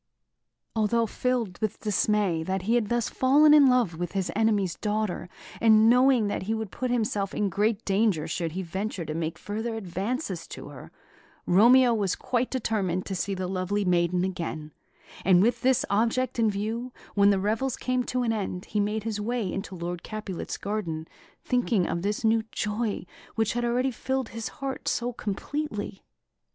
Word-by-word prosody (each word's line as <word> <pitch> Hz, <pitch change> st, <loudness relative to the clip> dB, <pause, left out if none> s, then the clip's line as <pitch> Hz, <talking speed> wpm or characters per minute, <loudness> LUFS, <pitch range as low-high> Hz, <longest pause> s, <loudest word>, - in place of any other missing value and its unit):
Although 225 Hz, +1 st, +2 dB
filled 230 Hz, -4 st, -2 dB
with 215 Hz, -3 st, -2 dB
dismay 210 Hz, -4 st, +1 dB
that 190 Hz, +3 st, -2 dB
he 220 Hz, +5 st, +1 dB
had 235 Hz, -4 st, +1 dB
thus 240 Hz, -2 st, +1 dB
fallen 295 Hz, +4 st, +5 dB
in 290 Hz, -2 st, +8 dB
love 245 Hz, -10 st, +2 dB
with 175 Hz, 0 st, -3 dB
his 195 Hz, -2 st, -1 dB
enemy's 205 Hz, -5 st, +2 dB
daughter, 210 Hz, -4 st, -2 dB, 0.3 s
and 220 Hz, -1 st, +6 dB
knowing 250 Hz, -2 st, +5 dB
that 205 Hz, -, -2 dB
he 215 Hz, +4 st, -1 dB
would 220 Hz, -4 st, -4 dB
put 255 Hz, -, -3 dB
himself 215 Hz, -5 st, -1 dB
in 205 Hz, -1 st, +1 dB
great 210 Hz, +3 st, 0 dB
danger 195 Hz, -5 st, +1 dB
should 165 Hz, -3 st, -3 dB
he 190 Hz, +2 st, -3 dB
venture 190 Hz, +1 st, -4 dB
to 155 Hz, -, -4 dB
make 160 Hz, 0 st, -3 dB
further 220 Hz, +4 st, -4 dB
advances 195 Hz, -, -3 dB
to -, -, -9 dB
her, -, -, -11 dB, 0.5 s
Romeo 240 Hz, +6 st, +6 dB
was 200 Hz, -5 st, 0 dB
quite 250 Hz, 0 st, -1 dB
determined 200 Hz, -8 st, -1 dB
to 195 Hz, -, -4 dB
see 195 Hz, +2 st, -2 dB
the 185 Hz, 0 st, -3 dB
lovely 190 Hz, +2 st, -1 dB
maiden 175 Hz, 0 st, +2 dB
again; 165 Hz, -4 st, -4 dB, 0.5 s
and 185 Hz, -1 st, +5 dB
with 230 Hz, +4 st, +2 dB
this 260 Hz, -1 st, +3 dB
object 235 Hz, +4 st, +1 dB
in 225 Hz, -1 st, +4 dB
view, 220 Hz, +5 st, -3 dB, 0.2 s
when 200 Hz, 0 st, +5 dB
the 200 Hz, -, +4 dB
revels 225 Hz, +7 st, -1 dB
came 255 Hz, 0 st, 0 dB
to 250 Hz, 0 st, -1 dB
an 230 Hz, -2 st, +1 dB
end, 195 Hz, -4 st, -3 dB
he 210 Hz, -, -2 dB
made 210 Hz, +1 st, 0 dB
his 215 Hz, -2 st, -3 dB
way 225 Hz, -3 st, -2 dB
into 195 Hz, -1 st, -5 dB
Lord 175 Hz, 0 st, -4 dB
Capulet's 215 Hz, -4 st, -5 dB
garden, 170 Hz, -6 st, -3 dB, 0.4 s
thinking 235 Hz, -6 st, +1 dB
of 170 Hz, -, -2 dB
this 205 Hz, +4 st, -2 dB
new 225 Hz, 0 st, +3 dB
joy 210 Hz, -1 st, -2 dB, 0.3 s
which 225 Hz, -1 st, +1 dB
had 240 Hz, 0 st, -1 dB
already 250 Hz, +2 st, +1 dB
filled 260 Hz, +1 st, -2 dB
his 230 Hz, -1 st, -5 dB
heart 270 Hz, -1 st, -5 dB
so 245 Hz, +1 st, 0 dB
completely. 210 Hz, -1 st, -4 dB
210 Hz, 175 wpm, -27 LUFS, 190-235 Hz, 0.5 s, in